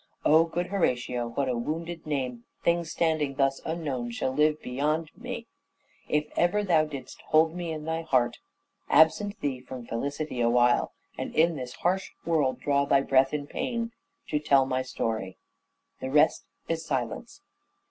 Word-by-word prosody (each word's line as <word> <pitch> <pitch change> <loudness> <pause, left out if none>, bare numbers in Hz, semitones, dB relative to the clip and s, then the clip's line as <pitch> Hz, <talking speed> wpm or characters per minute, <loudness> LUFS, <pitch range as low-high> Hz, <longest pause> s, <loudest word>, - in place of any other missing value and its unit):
O 160 +2 +6
good 175 +2 -2
Horatio, 125 -10 0
what 135 +4 -1
a 125 - 0
wounded 165 +7 -4
name 130 -5 -2 0.2
Things 170 -1 +1
standing 155 -5 0
thus 135 0 +1
unknown, 145 -7 -3
shall 120 +2 -2
live 150 +2 +3
behind 150 +5 -1
me! - - -6 0.6
If 150 0 +2
ever 195 +5 +2
thou 165 -5 +3
did'st 140 -4 -8
hold 160 +1 +4
me 175 -2 -4
in 155 -1 -5
thy 160 0 -1
heart. 130 -7 +1 0.5
Absent 200 +6 +4
thee 135 -3 -1
from 125 -1 -8
felicity 140 +3 -3
awhile, 120 +1 +3 0.3
And - - -4
in 165 +1 +4
this 125 -3 -6
harsh 185 +2 0 0.2
world 150 -6 +1
draw 140 -1 +2
thy 140 -1 +4
breath 135 0 +3
in 150 -1 -2
pain, 230 - -3 0.4
To 150 - +1
tell 140 -3 +4
my 130 -1 0
story....... 110 -6 -3 0.6
The 130 - -4
rest 150 +3 +3 0.2
is 165 0 -1
silence." 130 -7 -4
150 Hz, 160 wpm, -28 LUFS, 130-160 Hz, 0.6 s, O